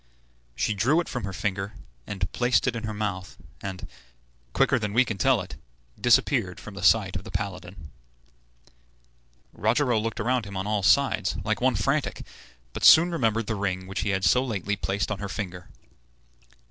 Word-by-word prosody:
She 110 - 0
drew 125 - +2
it 175 - -2
from 125 -5 -4
her 100 - -4
finger 95 +2 -3 0.3
and 95 -3 -4
placed 125 0 +2
it 125 -2 0
in 115 -1 -4
her 110 - -3
mouth, 95 -3 -4 0.2
and, 95 -2 -6 0.6
quicker 135 - +2
than 105 -2 -3
we 125 +3 +4
can 105 -5 -5
tell 130 -6 +3
it, 90 - -9 0.4
disappeared 120 -5 +2
from 105 - -10
the 100 - -8
sight 95 -1 +3
of 95 - -4
the - - -10
paladin. 90 -5 -6 1.6
Rogero 120 +3 +1
looked 115 +1 -3
around 125 -2 0
him 100 -1 -7
on 95 - -3
all 105 -1 0
sides, 95 - +2
like - - -1
one - - +2
frantic, - - -1 0.5
but - - -6
soon 170 +2 +8
remembered 115 -8 0
the 110 - -2
ring 95 -3 -2
which 95 +2 -5
he 105 - -1
had 95 0 0
so 125 +10 +4
lately 105 -5 -2
placed 100 +1 -2
on 105 - -3
her 100 -1 -5
finger. 90 -4 -6
105 Hz, 180 wpm, -26 LUFS, 95-115 Hz, 1.6 s, soon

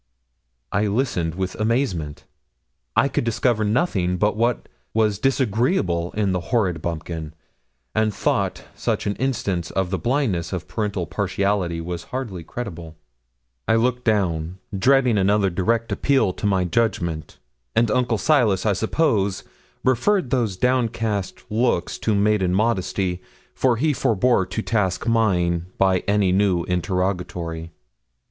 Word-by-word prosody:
I 105 +1 +1
listened 100 -8 -1
with 95 0 -2
amazement. 110 - -1 0.7
I - - +4
could 140 - -1
discover 115 -1 +1
nothing 105 - +1
but 105 +3 +1
what 120 +2 0 0.3
was 105 -3 +2
disagreeable 110 - +1
in 100 -2 0
the 90 - 0
horrid 95 -9 +1
bumpkin, 80 -2 -5 0.6
and 110 0 +2
thought - - -1
such - - -2
an 100 - -1
instance 100 -10 -1
of 95 -2 -1
the 95 - -1
blindness 110 - 0
of 90 -1 -4
parental 105 -5 -2
partiality 100 -2 -1
was 85 0 -5
hardly 115 -10 -5
credible. 85 -5 -7 0.7
I - - +4
looked 125 +2 +1
down, 90 -6 0 0.2
dreading 125 0 +3
another 100 0 +2
direct 115 +6 0
appeal 135 -9 +2
to 105 - -2
my 95 -2 +2
judgment; 85 -6 -1 0.4
and 115 -1 +3
Uncle 125 -2 +1
Silas, 110 -8 +2
I 105 - +3
suppose, 110 - +1 0.4
referred 130 - +2
those 115 -8 0
downcast 115 -5 0
looks 115 -5 0
to 110 - +1
maiden 100 -3 +2
modesty, 95 -4 0 0.3
for 130 -2 +2
he 150 +5 +2
forbore 115 -4 +2
to 110 - -2
task 105 -4 0
mine 90 -7 +1
by 95 -1 +3
any 100 -2 +3
new 95 -2 +2
interrogatory. 90 -2 -2
100 Hz, 130 wpm, -22 LUFS, 90-115 Hz, 0.7 s, I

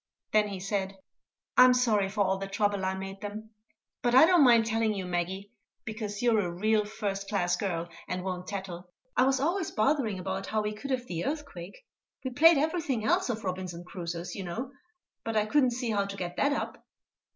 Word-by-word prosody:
Then 215 -1 +4
he 195 -2 -5
said: 195 0 -2 0.6
"I'm 255 0 +8
sorry 215 -6 +2
for 205 +1 -2
all 190 0 0
the 195 - -4
trouble 200 0 0
I 190 0 0
made 195 +1 -7
them; 215 +1 -7 0.5
but 240 0 +2
I 265 - +9
don't 350 -3 +5
mind 235 -3 +6
telling 225 -1 +1
you, 190 -2 -4
Maggie, 180 +3 -3 0.3
because 215 -1 -5
you're 235 -3 +4
a 180 -4 0
real 210 +4 +1
first 200 -2 -4
class 180 -4 +1
girl, 175 -4 -2 0.2
and 180 0 -3
won't 185 -1 -4
tattle. 185 -3 -6 0.3
I 255 - +4
was 270 -1 +2
always 335 +5 0
bothering 225 -3 +1
about 190 +1 -4
how 215 -1 0
we 210 0 -2
could 215 +6 -8
have 255 -2 -1
the 170 -7 -4
earthquake. 280 - -6 0.4
We 260 - -2
played 325 +5 +6
everything 295 -6 0
else 220 - +2
of 225 -2 -3
Robinson 185 -2 -4
Crusoe's, 175 -1 -6
you 195 - -5
know, 230 +10 -5 0.5
but 225 -1 -2
I 210 - +3
couldn't 265 +2 +3
see 245 -1 -2
how 200 -2 +1
to 200 0 -7
get 175 -2 -4
that 285 - +2
up." - - -4
210 Hz, 200 wpm, -29 LUFS, 190-245 Hz, 0.6 s, I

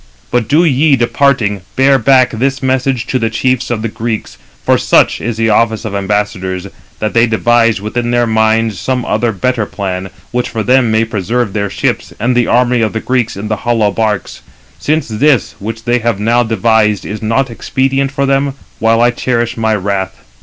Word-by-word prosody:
But 120 -3 +1
do 155 +4 +3
ye, 145 0 +3
departing, 120 -5 +1
bear 135 0 +4
back 130 +2 +4
this 135 +4 -1
message 130 -1 0
to 130 - -1
the 115 -1 0
chiefs 130 +3 -1
of 115 -2 -2
the - - 0
Greeks, 110 0 -4 0.3
for - - +4
such - - +2
is 115 -1 -3
the 115 0 +1
office 110 +1 +1
of 105 - -4
ambassadors, 100 -2 -2 0.3
that 110 - -2
they 115 +1 +4
devise 115 0 +2
within 120 +4 -3
their 120 0 +2
minds 110 -2 +1
some 125 +2 -2
other 120 -1 0
better 110 +2 -1
plan, 95 -1 -4 0.2
which 125 0 -1
for 110 -2 -3
them 125 0 +3
may 110 +1 +2
preserve 115 0 -2
their 100 -1 -1
ships, - - -2
and 120 +3 +1
the 120 -1 +2
army 125 0 +2
of 110 - 0
the 110 - -2
Greeks 125 -3 -1
in 105 +2 -5
the 110 0 -1
hollow 115 -3 +1
barks; 105 -1 -2 0.4
since 155 +2 0
this, 120 +1 +1
which 110 +2 -6
they 120 +1 +1
have 115 -3 -1
now 115 +3 +2
devised, 110 -2 +1
is 105 +1 -5
not 115 +4 0
expedient 135 +3 -1
for 140 0 -1
them, 135 0 0 0.2
while 115 +1 +2
I 120 +1 +4
cherish 120 -1 -1
my 110 -1 0
wrath. 95 -1 -2
115 Hz, 190 wpm, -13 LUFS, 110-125 Hz, 0.4 s, bear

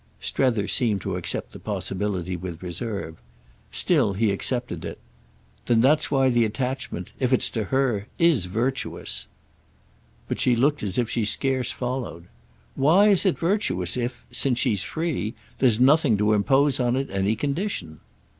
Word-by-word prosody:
Strether 115 -7 0
seemed 110 -5 +2
to 95 -2 -3
accept 90 - -2
the - - -11
possibility 95 -2 -3
with 90 -1 -7
reserve. 90 -2 -4 0.5
Still 100 - +2
he 105 +1 +1
accepted 120 +5 -2
it. - - -6 0.7
"Then 120 -2 +3
that's 145 +6 +3
why 135 -2 +3
the 120 -1 +3
attachment—if 125 0 -3
it's 130 - +3
to 110 -3 -2
her—is 130 - +1
virtuous." 120 +8 -3 1.0
But - - -3
she 125 - +3
looked 145 +5 +2
as 100 -3 -2
if 120 -2 +1
she 115 0 -1
scarce 130 +3 0
followed. 125 -9 -4 0.5
"Why 170 +10 +4
is 200 0 +4
it 185 - +1
virtuous 95 - 0
if—since 125 +1 -2
she's 120 -7 +1
free—there's 125 - -1
nothing 135 -3 +4
to 105 +1 +2
impose 135 +6 +3
on 120 -1 +1
it 135 +1 -2
any 100 +2 0
condition?" 140 - -3
120 Hz, 140 wpm, -24 LUFS, 100-135 Hz, 1.0 s, Why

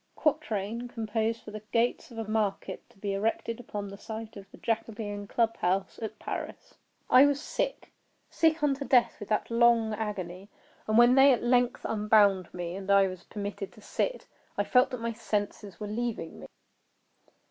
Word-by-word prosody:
[Quatrain 235 - -1
composed 225 -1 -2
for 210 - -9
the 215 0 -7
gates 235 +1 +1
of 235 - -12
a 225 -1 -4
market 210 -3 -2
to - - -24
be 200 0 -3
erected 225 +3 -1
upon 205 -4 -5
the 200 0 -10
site 220 0 -7
of 195 -1 -11
the - - -14
Jacobin 215 -2 -3
Club 230 +1 +1
House 190 +2 -1
at 220 -1 -5
Paris.] - - -6 0.3
I 260 +3 +7
was 285 -1 +1
sick—sick 325 -5 -2
unto 280 -1 +1
death 250 -3 +3
with 205 - -8
that 215 +2 0
long 230 -1 +4
agony; 200 -3 -5 0.4
and 215 0 +2
when 240 +1 +7
they 270 +1 +7
at 245 - +1
length 245 0 +2
unbound 210 -4 +3
me, 175 0 -5
and 195 0 -7
I 200 0 +6
was 185 -1 -8
permitted 200 -1 -5
to 215 - -16
sit, - - -2 0.3
I - - +2
felt 250 0 +4
that 250 -2 -6
my 230 0 -2
senses 205 -4 -3
were 210 - -4
leaving 215 -5 -4
me. - - -10
220 Hz, 175 wpm, -29 LUFS, 200-240 Hz, 0.4 s, I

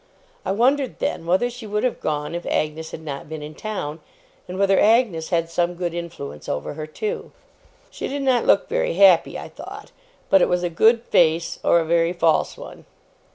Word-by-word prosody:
I - - -2
wondered 260 +6 +1
then, 165 - -3
whether 185 +7 +2
she 245 -2 -8
would 210 +1 -1
have 255 - 0
gone 150 +1 -2
if 175 0 -4
Agnes 155 +1 -1
had 160 - -9
not 145 -1 -6
been 155 -1 -6
in 150 +1 -8
town, 165 -6 -5 0.5
and 180 +1 -6
whether 195 0 +3
Agnes 215 -8 +3
had 165 -2 +1
some 175 +1 -1
good 175 -1 -3
influence 75 - -7
over 75 - -3
her 155 +1 -6
too! 430 - -4 0.6
She - - -5
did 280 0 -3
not 255 -3 +2
look - - +4
very - - -1
happy, 190 -3 +5
I - - -7
thought; - - -10 0.4
but 195 - +6
it - - +3
was 180 0 +1
a 175 - -1
good 225 +7 +4
face, 165 -5 +2
or 170 - +4
a 165 - -1
very 170 +1 +2
false 165 -3 +1
one. - - -11
175 Hz, 200 wpm, -22 LUFS, 160-210 Hz, 0.6 s, but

